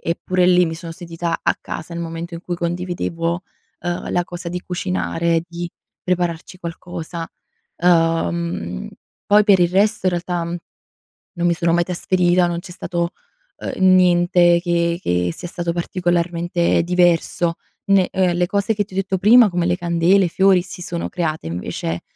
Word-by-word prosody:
eppure 180 +2 0
lì 180 0 +5
mi 160 -1 -3
sono 165 0 -8
sentita 170 0 -4
a - - +2
casa 170 - -7
nel 170 - -4
momento 165 +1 -6
in 170 - -6
cui 175 0 -4
condividevo, 170 0 -2 0.4
ehm, 175 0 -3
la 175 0 +1
cosa 175 0 -7
di 180 +1 -4
cucinare, 165 - -1
di 175 0 -6 0.3
prepararci 180 0 -2
qualcosa. 170 -1 -6 0.5
Ehm, 165 - +1 0.4
poi 210 +1 +5
per 195 -4 +5
il 175 -1 +4
resto 200 +1 +2
in - - +3
realtà, 175 0 -2
mhmm, 170 +1 -4 0.8
non 175 0 0
mi 170 - +3
sono 170 0 +1
mai 175 0 +3
trasferita, 180 0 +2
non 170 0 -2
c'è 175 0 -9
stato, 170 -1 -2 0.5
uhm, 185 -1 +2
niente 175 -1 +4
che 170 -1 0
che 90 - 0
sia - - -6
stato 170 -1 -3
particolarmente 175 -1 0
diverso 175 -1 +2 0.4
ne 195 -2 +4
ehm, 185 -2 +1
le 180 0 +2
cose 200 +3 0
che 205 0 0
ti 190 - -23
ho - - -7
detto 190 -1 0
prima, 225 +3 +7
come 175 -1 -1
le 175 - +1
candele, 175 +2 +3
i - - -2
fiori, 190 +1 +4
si 185 0 -9
sono 170 -1 -4
create 160 - -3
invece 85 -1 -4
175 Hz, 170 wpm, -20 LUFS, 170-180 Hz, 0.8 s, prima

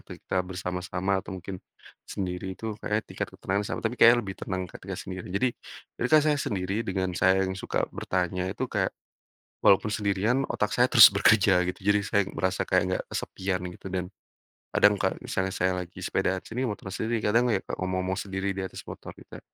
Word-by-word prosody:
ketika 95 - -2
bersama-sama, 90 +1 -2
atau 95 - -7
mungkin 95 +1 -7 0.5
sendiri 95 0 -4
itu 110 -1 -4
kayaknya 105 +1 -1
tingkat - - -5
ketenangan 100 +2 -1
sama, - - -3
tapi 110 +2 -2
kayaknya 120 +1 +9
lebih 95 -1 -5
tenang 95 -1 -3
ketika 95 +1 -8
sendiri. 95 -1 -7
Jadi 100 +8 +1 0.5
ketika 125 +6 +5
saya 150 -1 +2
sendiri 95 +1 -2
dengan 95 -4 -2
saya 95 +2 +3
yang 95 - -2
suka 95 - -2
bertanya 90 0 -1
itu 95 - -3
kayak, - - -1 0.7
walaupun 95 +2 +5
sendirian 105 +6 +1
otak 105 - 0
saya 125 - +5
terus 110 -4 +10
bekerja, 100 -2 +5
gitu. 90 - -3
Jadi 105 0 +4
saya 100 0 +2
merasa 95 0 0
kayak 90 - +4
enggak 95 - -1
kesepian 95 -1 -3
gitu, 90 - -13
dan 90 -1 -1 0.7
kadang 105 - +5
kalo 95 - 0
misalnya 95 0 -1
saya 95 +1 +2
lagi 90 +1 -16
sepedaan 95 0 0
sini, 125 +3 -3
motor 105 -2 -6
sini, 115 +2 -1
kadang 120 +4 +3
ya - - +3
Kak, - - -4
ngomong-ngomong 95 0 -1
sendiri 95 0 -3
di 95 - -2
atas 95 - -7
motor - - -8
kita. - - -12
95 Hz, 185 wpm, -27 LUFS, 95-105 Hz, 0.7 s, terus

